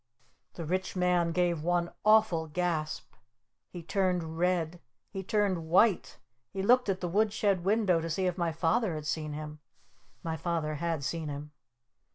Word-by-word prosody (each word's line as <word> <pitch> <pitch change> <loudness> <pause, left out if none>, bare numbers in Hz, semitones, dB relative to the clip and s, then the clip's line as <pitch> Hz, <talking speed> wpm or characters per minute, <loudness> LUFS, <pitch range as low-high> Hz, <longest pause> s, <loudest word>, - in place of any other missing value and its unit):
The 165 - -5
Rich 185 +4 -2
Man 180 -2 +2
gave 175 -2 +1
one 175 +1 0
awful 215 -7 +4
gasp! 160 -1 -2 0.6
He 175 -2 -8
turned 180 -3 0
red! 175 -1 0 0.3
He 195 - -4
turned 190 -4 0
white! 195 +3 +3 0.3
He 195 -1 -4
looked 250 +1 +4
at 190 -1 -1
the 180 - -1
wood 210 +4 +2
shed 200 -4 +1
window 200 -3 +3
to 165 - -4
see 185 +4 -1
if 180 -2 0
my 170 -2 0
Father 165 +4 +1
had 155 -1 -6
seen 155 -1 -2
him. 150 0 -7 0.6
My 160 -1 -3
Father 160 -2 -2
had 165 -4 -1
seen 160 +2 -3
him! 145 +1 -6
175 Hz, 165 wpm, -30 LUFS, 160-190 Hz, 0.6 s, awful